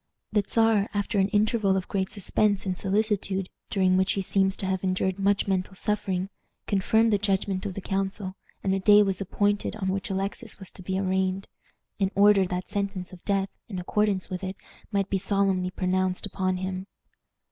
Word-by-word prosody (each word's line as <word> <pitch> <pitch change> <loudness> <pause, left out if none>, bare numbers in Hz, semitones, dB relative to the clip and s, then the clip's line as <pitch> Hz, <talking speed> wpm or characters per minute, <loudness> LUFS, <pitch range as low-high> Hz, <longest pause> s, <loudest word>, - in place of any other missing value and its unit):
The 210 -1 +2
Czar, 225 -3 +3
after 205 +1 0
an 190 - +4
interval 210 -1 +2
of 185 - -3
great 190 -1 -1
suspense 205 0 0
and 185 -1 -1
solicitude, 195 -1 0 0.2
during 185 -2 +3
which 190 0 +3
he 195 - -1
seems 190 0 +2
to - - 0
have 190 0 -1
endured 185 0 0
much 200 +1 +2
mental 190 0 -1
suffering, 195 -2 -1 0.3
confirmed 220 +3 +2
the 205 - +3
judgment 195 0 0
of 190 - -6
the 195 - -4
council, 195 0 -2 0.3
and 190 - +1
a 195 - +1
day 205 +2 +7
was 195 -1 -1
appointed 205 +2 0
on 190 -3 -2
which 195 +2 -2
Alexis 195 +1 -3
was 190 -2 -9
to - - -11
be 190 +1 -2
arraigned, 190 0 0 0.5
in 195 -1 +2
order 200 -1 +5
that 180 +1 -3
sentence 195 -2 -3
of 180 - -12
death, 195 -1 +1 0.2
in 195 - -5
accordance 195 +1 0
with 185 0 -5
it, 190 +1 -3 0.4
might 200 -2 +1
be 195 - +2
solemnly 195 -2 +1
pronounced 185 0 0
upon 185 -2 -1
him. 185 +1 -4
195 Hz, 185 wpm, -26 LUFS, 185-205 Hz, 0.5 s, day